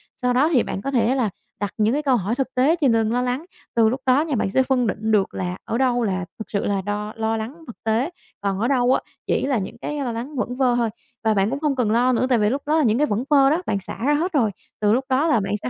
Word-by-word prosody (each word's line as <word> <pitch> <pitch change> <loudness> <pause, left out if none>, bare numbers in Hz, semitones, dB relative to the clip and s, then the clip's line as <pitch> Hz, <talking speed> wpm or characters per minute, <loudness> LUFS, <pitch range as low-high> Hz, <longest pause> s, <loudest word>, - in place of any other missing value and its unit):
Sau 250 -1 0
đó 270 +6 +3
thì 250 - +4
bạn 195 - -4
có 275 - -3
thể 245 0 +2
là 245 -5 +1 0.3
đặt 205 0 -3
những 215 +1 +2
cái 295 - 0
câu 270 -3 +3
hỏi 210 +3 -1
thực 265 0 -3
tế 270 +6 +4
trên 265 -5 +4
từng 225 -1 +2
lo 245 - +1
lắng, 250 +5 -2 0.3
từ 225 -1 +5
lúc 255 +3 -3
đó 260 +2 +4
nha 310 -3 -1
bạn 210 - 0
sẽ 260 +7 +3
phân 255 -2 +1
định 220 +2 -2
được 205 -3 +2
là 180 0 -3
ở 230 - -2
đâu 245 -2 +2
là 190 -4 -1
thật 220 - -5
sự 200 - -1
là 200 -1 0
đo 205 +2 -4
lo 225 0 -1
lắng 255 +10 -6
thực 240 - -12
tế, 225 +7 +1 0.3
còn 195 -1 -1
ở 230 - +1
đâu 255 -1 +3
á - - +1 0.3
chỉ - - +1
là 270 -2 +1
những 190 -3 -5
cái 295 0 -3
lo 260 -4 -2
lắng 240 +6 -6
vẩn 250 -1 -2
vơ 255 -2 +3
thôi. 235 -2 +1 0.3
Và 220 -1 +3
bạn 195 0 +2
cũng 275 +3 -3
không 295 -2 0
cần 240 -5 +1
lo 245 +3 +3
nữa 250 - +2
tại 250 - +4
vì 210 0 +3
lúc 275 +5 -1
đó 305 +2 +2
là 315 - +3
những 225 -3 +3
cái 300 +2 +2
vẩn 215 +2 -1
vơ 275 -2 +5
đó 320 +5 +1
bạn 200 - 0
xả 195 - -8
ra 295 - +3
hết 335 +6 0
rồi, 235 -8 +2 0.3
từ 210 0 +3
lúc 260 +3 +1
đó 270 +5 +2
là 265 -8 +3
bạn 195 0 -2
sẽ 125 - -2
245 Hz, 305 wpm, -22 LUFS, 215-270 Hz, 0.3 s, từ